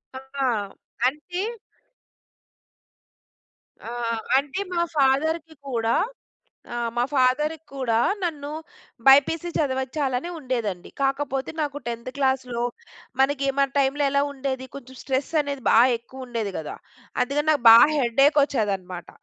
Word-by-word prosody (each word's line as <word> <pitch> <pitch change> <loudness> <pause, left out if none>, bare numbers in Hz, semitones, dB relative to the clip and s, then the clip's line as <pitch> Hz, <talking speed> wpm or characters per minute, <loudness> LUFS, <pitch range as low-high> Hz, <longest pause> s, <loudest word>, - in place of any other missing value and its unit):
ఆ! 265 +1 -4 0.6
అంటే 300 +6 -4 2.5
ఆహ్, 230 -1 -2 0.2
అంటే, 290 +7 -5
మా 340 - +2
ఫాదర్‌కి 315 +4 +1
కూడా 230 -2 0 0.8
ఆ! - - -3 0.2
మా 240 - +2
ఫాదర్‌కి 300 +4 +1
కూడా 240 -4 0 0.2
నన్ను 295 -5 -3 0.6
బైపీసీ 285 +5 +5
చదవచ్చాలని 265 +1 -1
ఉండేదండి. 235 - -3
కాకపోతే, 270 -1 -1
నాకు 290 -1 -2
10థ్ 235 +1 -4
క్లాస్‌లో 260 -3 0 0.6
మనకి, 275 0 +2
మన 275 0 +3
టైమ్‌లో 280 +1 +2
ఎలా 280 0 +2
ఉండేది, 265 -1 -4
కొంచెం 260 -1 -10
స్ట్రెస్ 265 0 -1
అనేది 280 -3 -4
బాగ 235 +2 +7
ఎక్కువ 260 +2 -11
ఉండేది 230 -4 -3
కదా. 155 - -6 0.5
అందుకని 285 +4 -1
నాకు 290 -5 +2
బాగా 230 +1 +10
హెడేక్ 275 +4 +3
వచ్చేదన్నమాట. 195 - -2
270 Hz, 110 wpm, -24 LUFS, 240-285 Hz, 2.5 s, బాగా